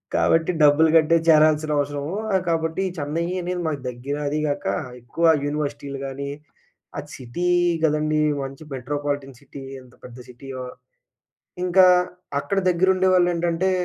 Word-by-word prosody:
కాబట్టి 165 +2 +2
డబ్బులు 150 +2 +5
కట్టే 165 +1 +4
చేరాల్సిన 155 -1 +4
అవసరము. 145 +2 -3 0.2
ఆహ్, 190 -1 +2
కాబట్టి 165 +2 -1
చెన్నై 155 +3 -2 0.2
అనేది 180 0 -3
మాకు 145 -3 -3
దగ్గర 125 +4 -5
అది 150 +1 -1
గాక, 145 - -3 0.4
ఎక్కువ 120 +8 -2 0.2
యూనివర్సిటీలు 145 -1 -4
గానీ, 140 +1 -5 0.7
ఆ - - -2
సిటీ 130 +8 -4 0.4
గదండీ! 155 0 +1 0.2
మంచి 135 +2 -8
మెట్రోపాలిటన్ 140 0 -4
సిటీ 140 0 -11 0.2
ఎంత 125 -1 -19
పెద్ద 120 0 -11
సిటీయో. 130 +1 -8 1.0
ఇంకా 185 +1 +5 0.6
అక్కడ 200 - -3
దగ్గరుండేవాళ్లేంటంటే 180 -1 +2
150 Hz, 120 wpm, -23 LUFS, 140-170 Hz, 1.0 s, డబ్బులు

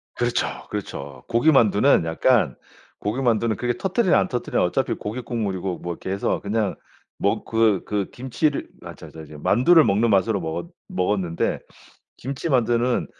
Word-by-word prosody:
그렇죠, 120 0 0 0.2
그렇죠. 70 0 -6
고기만두는 120 - +4
약간 80 - +2 0.4
고기만두는 115 0 0
그게 120 +4 -1
터뜨리나 190 - +2
안 - - +1
터뜨리나 125 - -1
어차피 105 +9 0
고기 110 +5 -5
국물이고 95 -7 -3
뭐 85 0 -4
이렇게 95 - -8
해서 100 - -1
그냥 105 0 -1 0.4
먹 - - 0
그 110 -4 +2
그 105 -2 -2
김치를 130 +4 -1 0.2
아 - - -8
저 - - -12
저 80 -1 -11
저 75 0 -12
만두를 155 - +5
먹는 110 +2 +2
맛으로 100 +1 +2
먹었 85 +1 -4 0.2
먹었는데 90 -2 -1 0.6
김치만두는 125 -3 0
110 Hz, 340 characters per minute, -23 LUFS, 95-125 Hz, 0.6 s, 만두를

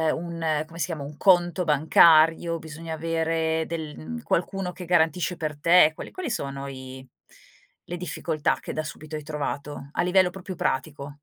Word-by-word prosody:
un 165 -2 -2
come 165 +1 -12
si - - +1
chiama, 155 -5 -5
un 145 +1 -8
conto 175 -2 +3
bancario, 160 +2 +5
bisogna 160 +1 -7
avere 160 0 0
del 160 -2 -5
mhmm, 80 0 -7
qualcuno 180 +1 -1
che 180 0 -9
garantisce 175 +1 +1
per 155 -3 -4
te, 170 -1 +6
quali - - -8
quali 360 -9 -4
sono 140 -5 -4
i 130 -1 -9 0.8
le 175 - -5
difficoltà 165 -3 -1
che - - -6
da 155 - -1
subito 155 0 -8
hai 150 - -8
trovato, 145 -2 -5
a - - 0
livello 180 0 +4
proprio 185 0 -8
pratico? 145 -4 -2
160 Hz, 165 wpm, -25 LUFS, 150-175 Hz, 0.8 s, te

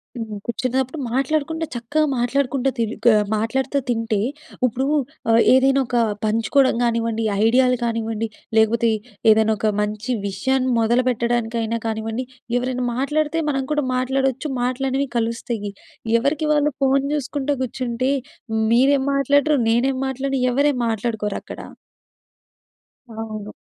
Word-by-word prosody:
హ్మ్. 220 -3 -5
కూర్చున్నప్పుడు 255 +4 -2
మాట్లాడుకుంటే 310 +4 0
చక్కగా 265 +7 0
మాట్లాడుకుంటా, 270 +1 +1
తి 230 - +1 0.2
గా 235 -2 +7 0.2
మాట్లాడుతా 265 +5 0
తింటే 225 -3 0 0.5
ఉప్పుడు 255 +2 -1 0.7
ఏదైనా 270 +1 +4
ఒక 245 - -1 0.3
పంచుకోవడం 230 +5 +2
కానివ్వండి, 230 -1 0 0.2
ఐడియాలు 250 +2 +4
కానివ్వండి, 225 -1 -2 0.3
లేకపోతే 225 +1 +3 0.4
ఏదైనా 220 0 +4
ఒక 215 +1 +1
మంచి 210 +4 -3 0.2
విషయాన్ని 260 +6 0
మొదలుపెట్టడానికైనా 235 -1 0
కానివ్వండి. 225 +3 -3 0.3
ఎవరైనా 250 0 -2
మాట్లాడితే 300 +4 0
మనం 270 -2 0
కూడా 295 -1 +1
మాట్లాడొచ్చు 265 +2 0
మాటలనేవి 265 +2 0
కలుస్తాయి. 230 -2 -2 0.5
ఎవరికి 295 +5 0
వాళ్ళు 295 0 +3
ఫోను 270 0 +3
చూసుకుంటా 285 0 -2
కూర్చుంటే 255 +1 -2 0.6
మీరేం 265 +3 +4
మాట్లాడరు 285 +2 +3
నేనేం 255 +4 +2
మాట్లాడను 270 +1 -2
ఎవరేం 280 +2 +2
మాట్లాడుకోరక్కడ. 220 -2 -3 1.6
అవును. 215 -2 -6
250 Hz, 105 wpm, -21 LUFS, 225-270 Hz, 1.6 s, గా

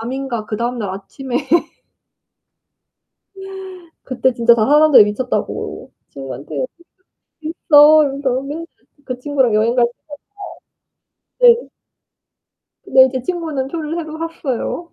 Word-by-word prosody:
밤인가 245 -1 -4
그다음 235 +3 -3
날 205 -4 -3
아침에 240 +7 -5 2.7
그때 260 0 0
진짜 235 0 +4
다 215 -2 +1
사람들이 300 -2 +6
미쳤다고 245 +5 -4 0.2
친구한테 140 - -6 0.8
"있어." 310 -1 +5
이러면서 270 -2 -2
맨날 300 +4 -6 0.4
그 255 -2 -5
친구랑 265 -4 0
여행 225 +3 +1
갈 245 -1 +4 1.5
때마다 480 -1 +6
네. - - -16 1.1
네 260 0 +5
제 260 -2 -3
친구는 315 -5 -3
표를 315 +1 -5
새로 315 -2 -6
샀어요. 330 0 -4
265 Hz, 235 characters per minute, -18 LUFS, 235-305 Hz, 2.7 s, 사람들이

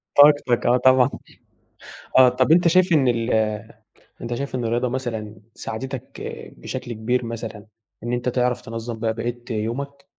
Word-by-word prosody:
طاقتك، 145 -4 +5
آه 125 - +4
طبعًا، 130 0 +5 1.1
آه. 130 -1 +8
طب 130 +4 +2
أنتَ 175 +1 +5
شايِف 185 +2 +4
إن 140 -5 +4
ال 115 0 0 0.9
أنتَ 120 0 -4
شايِف 140 +2 -4
إن 125 -2 -2
الرياضة 120 +2 0
مثلًا 115 -5 -4 0.2
ساعدتك 130 +3 -6 0.4
بشكل 125 -2 -6
كبير، 120 +3 -1
مثلًا 115 -2 -6 0.4
إن 120 +1 -2
أنتَ 120 +1 -1
تعرَف 125 0 0
تنظّم 115 0 -6
بقى 110 0 0
بقِيَّة 120 +2 -3
يومك؟ 140 +6 -4
120 Hz, 145 wpm, -22 LUFS, 115-130 Hz, 1.1 s, آه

